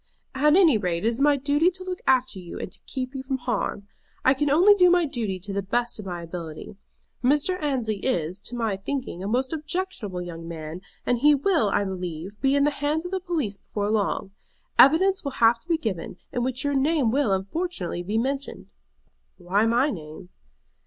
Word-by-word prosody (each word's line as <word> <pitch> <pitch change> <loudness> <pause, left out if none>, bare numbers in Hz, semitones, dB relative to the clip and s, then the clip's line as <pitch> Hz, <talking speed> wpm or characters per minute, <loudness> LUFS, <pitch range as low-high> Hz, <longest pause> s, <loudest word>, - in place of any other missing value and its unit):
"At 300 +3 +4
any 330 - +5
rate, 175 -3 -1 0.2
my 285 0 +4
duty 285 +4 +2
is 365 0 +1
to 370 - -8
look 370 -1 -4
after 255 -6 +2
you 175 -2 -8
and - - -6
to - - -9
keep 255 0 -4
you 265 - -4
from 265 0 -2
harm. 245 -5 -3 0.4
I 260 - +6
can 290 +2 0
only 355 +9 +6
do 365 -3 +5
my 355 -1 +4
duty 220 -9 -3
to 200 +2 -6
the 200 - 0
best 235 +4 -1
of 205 - -7
my 175 -2 -5
ability. 165 0 -7 0.5
Mr. 295 +8 +2
Annesley 250 -8 -1
is, 185 -5 -2
to 245 - -5
my 225 -5 -1
thinking, 250 -3 -4
a - - -3
most 255 +6 0
objectionable 305 - -3
young 165 -1 -8
man, 160 +1 -6 0.2
and 245 -1 +1
he 295 +3 +6
will, 285 - +2
I 205 - +1
believe, 185 0 -6
be 270 0 +3
in 280 - +3
the 295 - +3
hands 295 +3 -1
of 355 - -5
the 380 - -1
police 310 - -2
before 205 +1 -3
long. 200 -2 -1 0.5
Evidence 375 +8 +6
will 280 -2 -4
have 230 0 +4
to 315 - -15
be 335 - +3
given, 190 - -4
in 245 - -2
which 255 +2 -1
your 285 0 0
name 275 -3 +2
will, 270 -4 +1
unfortunately, 195 - -2
be 205 +5 -2
mentioned." 270 +4 -3 0.7
"Why 195 +5 +1
my 245 +6 +2
name?" 160 - -9
250 Hz, 200 wpm, -25 LUFS, 195-295 Hz, 0.7 s, I